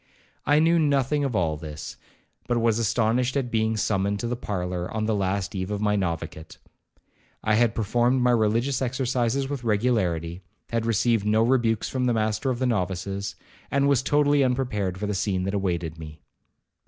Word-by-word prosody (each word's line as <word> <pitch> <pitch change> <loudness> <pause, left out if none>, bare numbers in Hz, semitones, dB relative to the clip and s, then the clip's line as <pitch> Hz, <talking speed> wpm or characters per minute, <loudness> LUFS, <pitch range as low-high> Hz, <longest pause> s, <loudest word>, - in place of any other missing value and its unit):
I 145 +2 +5
knew 165 +2 +4
nothing 145 -1 +2
of 135 -5 -1
all 80 -5 +1
this, 75 -1 -7 0.5
but 120 -1 +1
was 115 -1 +2
astonished 120 +4 +1
at 125 -3 -2
being 110 0 +1
summoned 100 -1 0
to 120 - -2
the 125 - -1
parlour 90 -5 -3
on 110 0 -2
the 110 - +1
last 95 -1 -1
eve 95 -1 -3
of 105 -1 -2
my 105 0 +1
noviciate. 85 -4 -4 0.9
I 110 - +2
had 115 +1 +3
performed 120 +4 +2
my 125 - +4
religious 115 +4 +1
exercises 130 0 0
with 140 -3 -4
regularity, 95 -7 0 0.3
had 115 -1 -1
received 115 -1 +2
no 110 +1 +3
rebukes 115 -3 +2
from 130 -1 -1
the 120 - +2
master 110 +4 0
of 125 - -1
the 130 - -1
novices, 100 -2 -2 0.3
and 140 0 +2
was 140 -3 +3
totally 145 0 +3
unprepared 120 -8 -1
for 105 - -3
the 105 - -1
scene 95 -1 -1
that 95 +1 -2
awaited 85 -5 -2
me. 80 -1 -9
110 Hz, 180 wpm, -25 LUFS, 95-125 Hz, 0.9 s, I